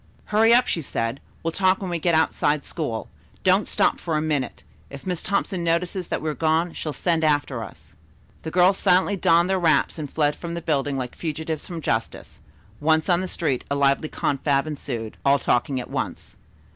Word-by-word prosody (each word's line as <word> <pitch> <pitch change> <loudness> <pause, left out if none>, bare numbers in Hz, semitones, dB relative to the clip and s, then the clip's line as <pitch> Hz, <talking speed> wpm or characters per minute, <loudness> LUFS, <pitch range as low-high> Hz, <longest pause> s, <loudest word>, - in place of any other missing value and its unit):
"Hurry 225 +2 +5
up," 245 +1 +6
she 165 - -1
said. 115 -2 -3 0.2
"We'll 165 - 0
talk 190 +2 +2
when 190 -3 -4
we 170 - -1
get 170 0 +2
outside 150 -2 +1
school. 120 -9 -4 0.4
Don't 190 +2 +3
stop - - +1
for 165 -3 -1
a - - +2
minute. 150 -5 -2 0.3
If 140 0 -10
Miss 180 -3 -2
Thompson 195 -2 -1
notices 170 +2 0
that - - -3
we 155 - 0
are - - -4
gone, 160 +2 +1
she'll 155 - -4
send 165 +1 0
after 145 -6 +1
us." 100 - -12 0.5
The 160 - -5
girls 185 +3 +4
silently 190 +1 +3
donned 170 -1 +3
their 190 0 +1
wraps 160 -1 +2
and 145 -3 -5
fled 150 -2 +1
from 170 -1 -6
the - - -3
building 145 -3 0
like 125 -2 -4
fugitives 160 -1 -4
from 170 -2 -6
justice. 115 -5 -3 0.4
Once 160 +3 +2
on 175 0 +3
the 185 - -3
street 150 -8 -1
a 140 - 0
lively 140 +2 +2
confab 140 0 0
ensued, 125 -7 -5
all 140 +1 +4
talking 130 0 0
at 125 - -6
once. - - -4
160 Hz, 195 wpm, -24 LUFS, 140-175 Hz, 0.5 s, up